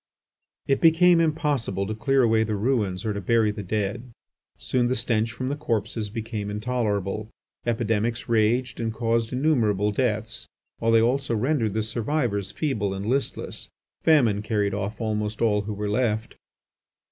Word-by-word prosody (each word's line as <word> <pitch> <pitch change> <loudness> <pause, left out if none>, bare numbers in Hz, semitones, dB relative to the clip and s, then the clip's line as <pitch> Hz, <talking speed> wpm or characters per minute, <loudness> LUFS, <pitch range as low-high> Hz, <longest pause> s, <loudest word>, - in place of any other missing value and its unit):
It 135 - +1
became 170 +1 +6
impossible 145 - 0
to 110 - -3
clear 135 +4 +2
away 110 -1 +3
the 110 -1 -2
ruins 105 -4 0
or 110 - 0
to 100 - -4
bury 110 +2 +2
the 105 0 -6
dead. 105 +5 -3 0.5
Soon 125 -2 0
the 130 - 0
stench 115 -1 +1
from 130 +3 -4
the 145 - -1
corpses 115 -6 -2
became 110 -1 -4
intolerable. 105 -2 -2 0.4
Epidemics 115 0 0
raged 115 +2 +1
and 115 -1 -1
caused 115 0 0
innumerable 115 -8 +2
deaths, 110 -2 -2 0.3
while 115 - +2
they 115 0 +5
also 130 +1 +1
rendered 115 -3 0
the 110 - +1
survivors 110 -3 -1
feeble 105 -7 -2
and 95 +1 -5
listless. 130 +5 -2 0.3
Famine 120 -11 +4
carried 105 -2 0
off 100 +1 -3
almost 105 -1 -2
all 105 -3 +2
who 105 +1 -5
were 105 +1 -3
left. 110 0 -1
110 Hz, 155 wpm, -25 LUFS, 105-125 Hz, 0.5 s, became